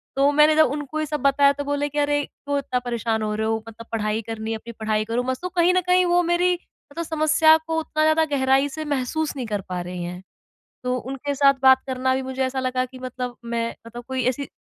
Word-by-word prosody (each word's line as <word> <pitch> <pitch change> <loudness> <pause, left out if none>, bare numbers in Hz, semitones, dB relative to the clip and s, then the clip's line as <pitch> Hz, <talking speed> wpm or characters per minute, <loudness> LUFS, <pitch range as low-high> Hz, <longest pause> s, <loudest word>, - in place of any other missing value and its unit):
तो 275 +1 +4
मैंने 300 +1 +5
जब 315 0 +6
उनको 295 +1 -4
ये 310 - 0
सब 300 0 -3
बताया 280 0 +4
तो 285 0 -5
बोले 285 0 -1
कि 295 - -8
अरे, 290 0 +1
क्यों 285 0 -4
इतना 255 -2 -1
परेशान 235 -2 -2
हो 215 0 -1
रहे 220 +1 -1
हो 225 - +1
मतलब 225 0 -10
पढ़ाई 215 -1 -1
करनी 225 0 -5
है 225 - -1
अपनी 230 +2 -10
पढ़ाई 215 -1 0
करो 230 +2 -1
मस्त। 260 0 -3
तो 365 - -3
कहीं 355 0 +3
न 370 - +3
कहीं 365 0 +4
वो 350 0 +3
मेरी 350 +1 +2
मतलब 335 -2 -8
समस्या 315 0 +4
को 320 0 0
उतना 310 -1 -1
ज़्यादा 315 +1 +4
गहराई 270 +1 +3
से 310 +3 -6
महसूस 290 +2 -2
नहीं 260 -3 -4
कर 205 -2 -2
पा 180 -1 -3
रही 180 0 -5
हैं। 180 +1 -6 0.6
तो 250 0 0
उनके 270 +3 -4
साथ 275 0 +5
बात 265 0 +6
करना 260 0 0
भी 265 - -1
मुझे 260 0 -5
ऐसा 260 +1 -2
लगा 255 0 0
कि 255 0 -13
मतलब 250 -1 -5
मैं 230 0 -1 0.2
मतलब 240 +1 -9
कोई 260 -1 -2
ऐसी 260 +2 -1
265 Hz, 240 wpm, -23 LUFS, 235-300 Hz, 0.6 s, जब